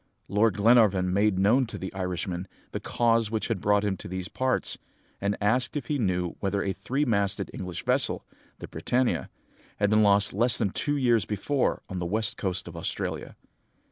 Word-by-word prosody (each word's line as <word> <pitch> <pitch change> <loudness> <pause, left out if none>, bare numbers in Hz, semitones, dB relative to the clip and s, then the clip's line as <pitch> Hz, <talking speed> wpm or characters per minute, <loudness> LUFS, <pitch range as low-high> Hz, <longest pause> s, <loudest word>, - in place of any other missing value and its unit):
Lord 105 0 +2
Glenarvan 100 -5 +4
made 100 0 +2
known 115 +7 +3
to - - -6
the 95 - -6
Irishman 90 -1 -3 0.2
the - - -3
cause 115 -2 +1
which 110 +1 -2
had 110 -6 -1
brought 105 0 +3
him 100 -2 0
to - - -8
these 95 0 -4
parts, 130 0 -1 0.4
and 100 +1 0
asked 125 +7 +1
if 145 - -4
he 145 -2 0
knew 90 -5 0
whether 100 0 -1
a 95 - -1
three 140 +8 -1
masted 100 -5 0
English 90 -2 -6
vessel, - - 0 0.3
the - - -8
Britannia, 125 0 0 0.5
had 105 0 +1
been 110 0 +5
lost 100 -1 +4
less 115 +3 +3
than 100 -4 0
two 145 +7 -1
years 120 -6 +3
before 125 +7 -1
on 95 -2 -5
the 85 - -2
west 110 +4 0
coast 95 -3 -2
of 85 - -9
Australia. 85 - -4
105 Hz, 185 wpm, -27 LUFS, 95-115 Hz, 0.5 s, been